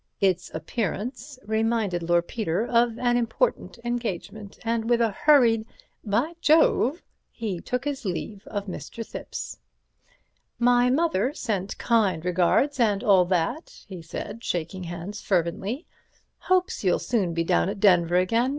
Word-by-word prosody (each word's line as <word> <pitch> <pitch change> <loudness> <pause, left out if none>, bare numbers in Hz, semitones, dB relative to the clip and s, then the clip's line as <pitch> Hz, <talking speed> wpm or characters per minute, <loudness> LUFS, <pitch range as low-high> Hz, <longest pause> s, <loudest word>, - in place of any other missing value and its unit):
Its 185 -2 +1
appearance 230 - -4
reminded 220 -4 0
Lord 175 0 +1
Peter 210 -2 -1
of 235 -1 +2
an 245 -1 +2
important 240 - -1
engagement, 220 -3 -4
and 230 0 -1
with 240 -1 +4
a 230 -2 +2
hurried 235 -2 +4 0.4
"By 235 +10 0
Jove!" 310 0 +3 0.3
he 210 -7 -4
took 250 +7 -3
his 285 -2 -3
leave 200 +2 -5
of 205 -1 -4
Mr. 225 +4 -7
Thipps. - - -7 1.0
"My 245 0 +4
mother 275 - +1
sent 200 -5 -3
kind 200 -8 +1
regards 180 +11 +2
and 210 -2 +2
all 195 -6 +5
that," 185 - -2
he 185 -3 -9
said, 205 +7 -7
shaking 175 +2 -3
hands 175 +5 -6
fervently; 195 - -1 0.5
"hopes 370 -7 0
you'll 180 -2 +3
soon 195 -8 -1
be 165 - +1
down 85 - +2
at - - -5
Denver 175 -4 +4
again. 230 +8 +2
215 Hz, 140 wpm, -25 LUFS, 180-240 Hz, 1.0 s, all